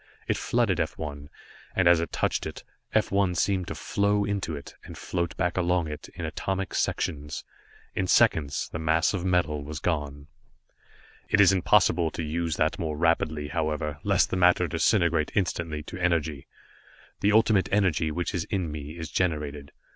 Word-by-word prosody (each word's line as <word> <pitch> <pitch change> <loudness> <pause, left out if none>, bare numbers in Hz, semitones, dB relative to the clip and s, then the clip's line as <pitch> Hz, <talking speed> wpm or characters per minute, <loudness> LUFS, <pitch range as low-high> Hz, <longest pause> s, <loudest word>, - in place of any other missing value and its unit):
It - - +1
flooded - - +1
F - - -2
1, 70 -2 -6 0.5
and 95 -2 +3
as 85 -1 +6
it 85 - -3
touched - - -1
it, - - -8 0.3
F - - +1
1 100 -2 +2
seemed 95 0 0
to - - -5
flow 100 0 +1
into 100 -6 -2
it, 70 - -9
and - - -10
float 85 -2 -3
back 90 -1 0
along 90 -2 +1
it, 75 - -7
in 90 -1 -4
atomic 95 +4 -3
sections. 75 -1 -2 0.5
In 95 - -1
seconds 70 -5 +3
the 80 - -4
mass 80 +3 +2
of 95 -3 -2
metal 85 -5 +1
was 75 +1 -6
gone. 75 -4 -2 1.0
"It 105 - +3
is 95 -2 +7
impossible 90 -2 +3
to 85 - -5
use 80 +1 -2
that 80 +1 0
more 80 -2 -2
rapidly, 80 -2 +1
however, 75 -1 -2
lest - - +2
the - - 0
matter 90 0 +4
disintegrate 85 -1 +2
instantly 85 -5 -1
to 90 - -8
energy. 80 -5 0 0.7
The 100 - +3
Ultimate 110 -2 +4
Energy 95 -6 +2
which 90 +5 -3
is 85 -4 -1
in 90 -6 -2
me 75 +2 -7
is 80 -1 -5
generated. 75 -5 -2
85 Hz, 170 wpm, -27 LUFS, 75-90 Hz, 1.0 s, is